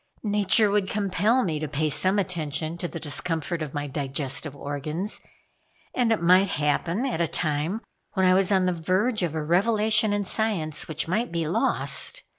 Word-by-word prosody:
Nature 210 0 +3
would 200 -2 +1
compel 210 +5 +1
me 160 -6 -1
to 155 - -3
pay 150 +2 -1
some 185 +6 +1
attention 160 -4 -2
to 175 0 -4
the 165 - -7
discomfort 165 +2 -2
of 150 -3 -5
my 145 0 -2
digestive 140 0 -3
organs, 150 +8 -3 0.7
and 240 -2 +1
it 225 - +2
might 185 +3 +5
happen 165 - 0
at 240 -11 -1
a 170 - +2
time 155 +7 -1 0.3
when 190 -1 +2
I 185 - +5
was 190 +1 +3
on 190 -2 +3
the 180 - +1
verge 190 +8 0
of 165 -3 -1
a 155 - -2
revelation 215 +5 +2
in 205 -1 0
science, 185 -8 0
which 160 0 -2
might 215 +6 -1
be 165 -2 -1
lost. - - +1
175 Hz, 180 wpm, -25 LUFS, 155-205 Hz, 0.7 s, might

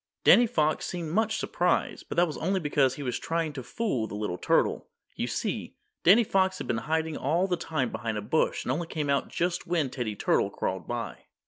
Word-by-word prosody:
Danny 240 0 +7
Fox 155 -6 +1
seemed 170 -3 -4
much 220 +3 +1
surprised, 175 0 0
but - - -4
that 175 - +5
was 155 - -5
only 190 +3 0
because 145 -5 +2
he 145 - -6
was 125 -3 -2
trying 165 -2 -2
to 135 - -5
fool 125 - -2
the 105 - -7
little 105 -4 -3
turtle. - - +1 0.3
You - - -2
see, - - -3 0.3
Danny 205 +8 +7
Fox 190 -2 +1
had - - -5
been 115 - -1
hiding 160 -1 0
all 165 +7 +1
the 185 -2 0
time 155 -7 -2
behind 110 -2 -3
a - - -2
bush 155 +9 0
and - - 0
only 165 +5 -2
came 150 -4 -2
out 140 - +1
just 175 +1 -2
when 165 -6 0
Teddy 115 -5 -3
Turtle - - +2
crawled - - -3
by. - - -5
160 Hz, 215 wpm, -28 LUFS, 130-180 Hz, 0.3 s, Danny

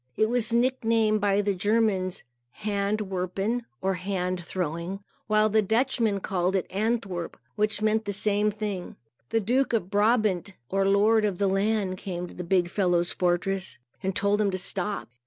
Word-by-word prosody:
It 215 - +3
was 240 -2 +2
nicknamed 230 -3 +2
by 200 0 +3
the 200 0 0
Germans 205 -2 0 0.4
Hand 205 0 0
Werpen, 195 +6 -2 0.2
or 190 0 +2
Hand 185 -1 -2
Throwing; 175 +3 -4 0.2
while 215 0 +4
the 215 +1 +3
Dutchmen 220 -1 +1
called 185 0 0
it 190 - +1
Antwerp, 200 -4 -2 0.2
which 210 0 0
meant 220 0 +2
the 205 - -2
same 210 +1 +1
thing. 205 -3 -4 0.3
The 225 - +2
Duke 245 +5 +1
of 200 -5 0
Brabant, 205 -3 +2 0.2
or 195 0 +1
Lord 210 +3 +4
of 200 -4 0
the 200 - +1
land, 195 -1 0
came 180 -2 -4
to - - -12
the 180 - -6
big 180 0 +2
fellow's 175 -2 +1
fortress 185 +2 -1 0.2
and 190 -1 -2
told 205 -1 +2
him 205 - +2
to 185 - -2
stop. 195 +2 -2
200 Hz, 165 wpm, -26 LUFS, 185-215 Hz, 0.4 s, while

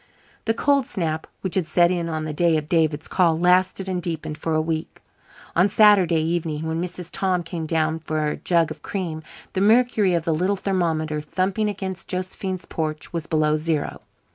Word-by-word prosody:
The 225 - +1
cold 280 0 +2
snap 160 -4 -2
which 190 - -3
had 185 -4 +1
set 175 0 +4
in 170 -2 -1
on 155 -1 -3
the 155 - -4
day 165 +1 +3
of 155 - -3
David's 160 -2 +1
call 170 -4 +2
lasted 185 +2 +2
and 185 -1 -2
deepened 160 -3 -4
for 160 0 -1
a - - +3
week. 160 0 -3 0.6
On 185 +4 +4
Saturday 190 -6 +5
evening, 160 -2 -2
when 160 +1 -2
Mrs. 180 -1 -5
Tom 185 -2 0
came 165 -1 -5
down 160 0 0
for 155 -1 -2
a 150 - -1
jug 170 -3 +1
of - - -8
cream, 170 -5 -4 0.3
the 190 - 0
mercury 215 -3 +4
of 170 - 0
the 165 - +1
little 185 +6 +1
thermometer 160 -6 -1
thumping 190 +7 -1
against 190 -2 -5
Josephine's 185 0 -4
porch 155 0 -4
was 165 -2 -3
below 155 -1 +2
zero. 155 -1 -2
170 Hz, 190 wpm, -23 LUFS, 160-185 Hz, 0.6 s, Saturday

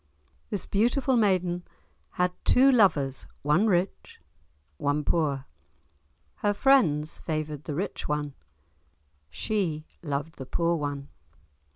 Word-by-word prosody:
This 205 -4 -2
beautiful 245 +6 +2
maiden 185 -5 +2 0.5
had 180 0 +1
two 270 +2 +5
lovers, 160 - +2 0.2
one 150 +9 +3
rich, 185 -1 -1 0.6
one 145 - 0
poor. 140 -4 0 0.9
Her 205 0 0
friends 170 - +3
favoured 155 -2 -4
the 150 - -4
rich 190 +6 -3
one, 150 -1 -2 1.0
she 170 - -2 0.2
loved 145 +1 -4
the 130 - -7
poor 170 +3 +1
one. 145 -2 -4
165 Hz, 105 wpm, -27 LUFS, 145-200 Hz, 1.0 s, two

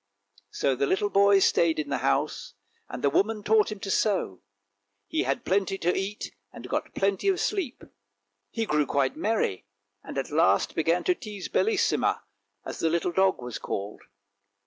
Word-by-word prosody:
" 100 0 -28
So 135 - 0
the 135 +2 0
little 205 +4 0
boy 200 0 +5
stayed 170 -3 +3
in 150 -2 -3
the 140 - -1
house, 70 - -1 0.3
and - - -7
the 140 - +4
woman 210 +6 +1
taught 215 0 +3
him 210 - -6
to 195 - -3
sew; 190 - 0 0.6
he - - -1
had 135 +2 -2
plenty 195 +1 +1
to 175 -1 0
eat, 195 +2 -4 0.2
and - - -10
got - - -3
plenty 195 - 0
of 385 -2 +2
sleep. 370 - -2 0.7
He 225 - -2
grew 150 -6 +1
quite 135 -2 +1
merry, 205 - -1 0.4
and - - -8
at 135 - -3
last 160 +3 +3
began 165 +2 +1
to 365 - +3
tease 210 - -8
Bellissima, 430 -2 +1 0.4
as - - -6
the 165 - +1
little 170 +2 0
dog 190 -6 +2
was 125 -2 -5
called. 100 +1 -5
190 Hz, 175 wpm, -27 LUFS, 140-210 Hz, 0.7 s, boy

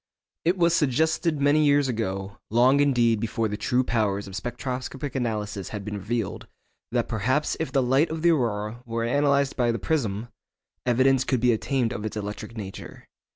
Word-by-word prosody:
It 175 +3 +2
was 170 -1 +3
suggested 160 +2 +1
many 145 +2 +4
years 145 -1 +4
ago, 100 -5 -3
long 125 +5 +4
indeed 120 -6 +3
before 115 +1 -1
the 105 - -3
true 125 +5 +1
powers 105 -4 0
of 95 - -8
spectroscopic 125 +5 -4
analysis 105 -6 -3
had 105 -2 -6
been 105 -1 -4
revealed, 110 +1 -3 0.4
that 120 -1 0
perhaps 130 +7 0
if 160 -4 -2
the 135 -1 +2
light 135 +6 +3
of 160 0 -4
the 170 - +6
aurora 115 -5 -1
were 115 -1 -3
analysed 140 +2 +2
by 120 -2 +2
the 115 - -2
prism, 120 -8 -1 0.6
evidence 130 +2 +4
could 130 -2 0
be 120 0 +4
obtained 120 +1 0
of 105 - -5
its 110 0 -4
electric 105 +3 -6
nature. 95 -3 -8
120 Hz, 175 wpm, -25 LUFS, 110-140 Hz, 0.6 s, the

